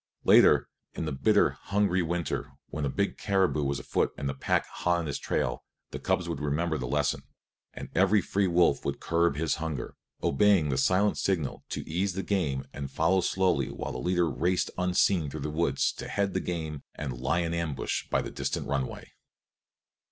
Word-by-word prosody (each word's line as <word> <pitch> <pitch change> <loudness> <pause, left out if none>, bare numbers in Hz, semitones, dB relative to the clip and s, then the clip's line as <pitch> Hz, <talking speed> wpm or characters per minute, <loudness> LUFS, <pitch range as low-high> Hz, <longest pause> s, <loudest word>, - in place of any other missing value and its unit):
Later, - - +6 0.3
in - - -3
the 75 - -2
bitter, 65 - +3
hungry 100 -2 +2
winter, 85 0 -2 0.2
when 75 0 -3
a - - 0
big 100 +8 -1
caribou 95 -6 +1
was 70 0 0
afoot 60 - 0
and 70 - -3
the 70 - -1
pack 65 - 0
hot 90 0 0
on 85 - -2
his 70 - -3
trail, - - -1 0.3
the - - -5
cubs - - 0
would - - -3
remember 80 +2 -1
the 65 - -3
lesson, 75 +1 0 0.5
and - - -6
every 100 +4 +4
free 100 +2 0
wolf 85 -5 +3
would - - -2
curb 85 -2 +1
his 80 +1 0
hunger, 80 -5 -4 0.3
obeying 85 +1 +4
the 65 - 0
silent 95 +8 +2
signal 85 -8 -1
to - - -5
ease 90 +4 -1
the 95 +1 -3
game 75 -10 -1
and 70 -1 -5
follow 95 0 +2
slowly 90 -8 +1
while 70 - -5
the - - -5
leader 90 -1 +1
raced 90 +3 0
unseen 90 -2 +2
through 75 +1 -6
the 75 +2 -3
woods 85 +3 +1
to - - -7
head 100 -1 -1
the - - +1
game 80 -4 -4
and 70 -4 -4
lie 65 +7 +1
in 85 -1 -2
ambush 85 -6 -2
by - - +1
the - - -6
distant - - -3
runway. 70 -2 -3
85 Hz, 190 wpm, -28 LUFS, 70-95 Hz, 0.5 s, Later